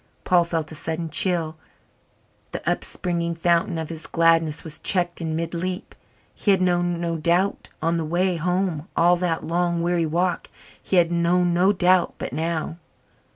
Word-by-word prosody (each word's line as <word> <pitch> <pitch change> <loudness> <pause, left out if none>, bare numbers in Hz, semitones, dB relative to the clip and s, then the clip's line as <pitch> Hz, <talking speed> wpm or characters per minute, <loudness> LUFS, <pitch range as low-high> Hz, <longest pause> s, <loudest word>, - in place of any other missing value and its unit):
Paul 175 -2 +3
felt 165 -2 -3
a - - -7
sudden 160 +1 -4
chill 165 -2 +1 1.0
the - - -6
upspringing 170 -1 -1
fountain 170 +1 +1
of 160 -1 -4
his 165 -1 -7
gladness 165 -2 +2
was 155 -2 -6
checked 175 -3 +1
in 160 -1 -2
mid 165 +1 -3
leap. 180 +3 -4 0.4
He - - -2
had 195 -1 +5
known 175 -1 +1
no 170 -1 -2
doubt 175 +5 0
on 165 +1 +1
the 165 - -2
way 175 +3 0
home 180 -2 -1
all 175 +1 +5
that 170 -2 -1
long, 170 0 0
weary 170 -1 +1
walk 175 +3 -1 0.3
he - - -2
had 175 -1 +4
known 175 +1 +2
no 180 +3 +4
doubt 185 -2 +2
but - - -5
now? 160 0 -2
170 Hz, 165 wpm, -23 LUFS, 165-180 Hz, 1.0 s, had